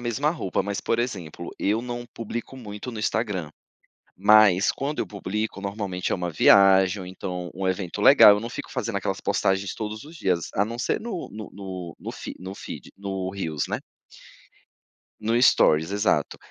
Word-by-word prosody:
mesma 120 +5 0
roupa, 155 - -2
mas 100 0 -3
por 115 - 0
exemplo, 90 -8 -4
eu 105 +3 +1
não 120 0 -5
publico 115 +3 -6
muito 105 0 -7
no 115 - -7
Instagram. 105 -7 -1 0.7
Mas 105 -2 +6
quando 145 +2 -3
eu - - 0
publico 105 0 -4
normalmente 100 -2 -3
é - - +3
uma 90 -2 -3
viagem 95 +3 +5
ou 90 - -7
então 90 -1 -5
um 95 0 -3
evento 95 -2 -2
legal, 105 - +9
eu 105 - +1
não 115 - -5
fico - - -7
fazendo - - -3
aquelas - - -2
postagens 95 0 0
todos 110 +2 -5
os 155 - -12
dias. 90 - -1
A 100 - +3
não 115 +3 -3
ser - - 0
no 215 -6 -5
no 105 -2 -7
no 95 -4 -7
no - - -6
fe - - -7
no 95 +2 -7
feed - - -9
no 95 -2 -3
reels, 80 -7 -3
né. - - -3 1.4
No 115 +2 +1
stories, 80 -8 +4
exato. 100 -1 +1
100 Hz, 180 wpm, -25 LUFS, 95-115 Hz, 1.4 s, legal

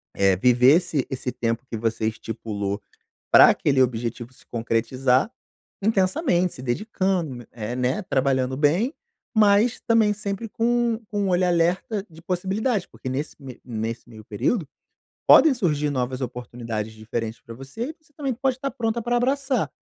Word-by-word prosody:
eh, 95 -1 +4
viver 125 - +5
esse 160 -7 -1
esse 130 -1 -3
tempo 115 0 -2
que 115 - -4
você 110 0 -1
estipulou 105 -2 -4 0.5
pra - - +9
aquele 135 -2 +2
objetivo 120 0 -2
se - - -20
concretizar, 125 - +1 0.5
intensamente. 190 - +2
Se 130 - -9
dedicando, 165 - -2
eh 115 +1 -5
né, 130 +9 0
trabalhando 130 -5 0
bem, 170 - +2 0.4
mas 215 +3 +4
também 225 -2 +4
sempre 200 +2 -4
com 235 +1 +1
com 205 -2 -1
olhar 180 0 +2
alerta 180 +4 0
de 160 0 -14
possibilidade. 190 +4 -1
Porque - - -8
nesse 135 +4 -3
ne 130 -3 -10
nesse 115 0 -4
meio 110 -2 -12
período, 150 - -1 0.6
podem 315 - +8
surgir 150 - 0
novas 130 -1 -2
oportunidades 120 -3 -5
diferentes 110 +1 -5
pra 115 - -10
você 140 - -6
e 315 - -8
você 305 -1 -30
também 275 -3 -2
pode 260 +1 -1
tá 275 - -2
pronta 230 0 -2
pra 240 +1 0
abraçar. 270 +2 0
145 Hz, 150 wpm, -24 LUFS, -, 0.6 s, pra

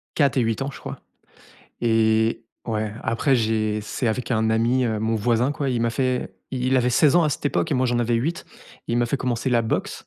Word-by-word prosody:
4 140 -3 +2
et - - +4
8 115 +3 -1
ans, 135 - -1
je - - -11
crois. - - -7 0.8
Et, 110 0 +2 0.2
ouais 110 -2 -2
après 115 +5 +1
j'ai 110 -2 0
c'est 110 +4 -3
avec 120 +3 -2
un 110 -1 +1
ami, 120 +3 +2
heu, 110 -3 -1
mon 110 +1 0
voisin, 120 +4 +1
quoi, 140 -1 -2
il 120 -2 -1
m'a 115 - +1
fait 130 +1 -1 0.2
il 130 +1 +1
avait 125 0 +2
16 145 +5 +4
ans 170 - +5
à - - +2
cette 140 - -4
époque 145 - 0
et - - +1
moi 130 0 +2
j'en 120 -1 0
avais 120 0 +1
8. 145 +9 -2 0.4
Il 120 - 0
m'a 120 - +2
fait 140 - -1
commencer 125 0 -2
la 120 -1 +3
boxe. 110 - -3
120 Hz, 235 wpm, -23 LUFS, 110-130 Hz, 0.8 s, ans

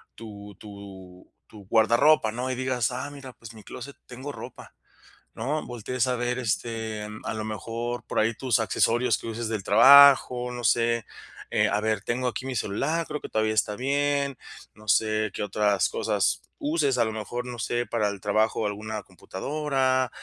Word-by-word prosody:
tu 105 -3 -10
tu 95 -3 -12 0.2
tu 105 -2 -14
guardarropa, 115 +3 +4
¿no?, 125 +3 -3
y 130 - -2
digas: 130 -2 -1
"Ah, 130 +3 -4
mira, 140 -3 -10
pues, 115 -1 -12
mi 110 - -13
clóset, 135 +3 -9
tengo 130 +3 -7
ropa", - - -11 0.6
¿no? 145 +7 -3
Voltees 120 +1 -2
a 125 - 0
ver, 120 +1 -2
este, 110 -2 -3 0.2
a - - -2
lo 110 -1 -4
mejor 115 +3 -4
por - - -1
ahí 110 +2 +2
tus 125 -3 +1
accesorios 115 +1 +2
que - - -9
uses 115 0 -4
del 110 -3 -3
trabajo, 125 +2 +7
no 120 0 -6
sé. 115 0 +2 0.5
Eh, - - +3
a 105 - 0
ver, 110 0 0
tengo 125 +2 -1
aquí 125 +3 -6
mi 130 -1 -4
celular, 140 +11 -1
creo 150 - -4
que - - -6
todavía 110 0 0
está 105 -1 0
bien. 140 +1 0 0.4
No 105 0 -17
sé 110 +1 +2
qué - - -3
otras 105 -1 +1
cosas - - 0 0.2
uses, 145 -3 +1
a 120 - +4
lo 110 - -2
mejor, 110 +3 -5
no 125 -1 -7
sé, 120 +2 -1
para 115 -3 0
el 100 -1 -7
trabajo, 110 +2 +1
alguna 105 +1 -4
computadora, 130 +6 -1
115 Hz, 180 wpm, -26 LUFS, 110-130 Hz, 0.6 s, trabajo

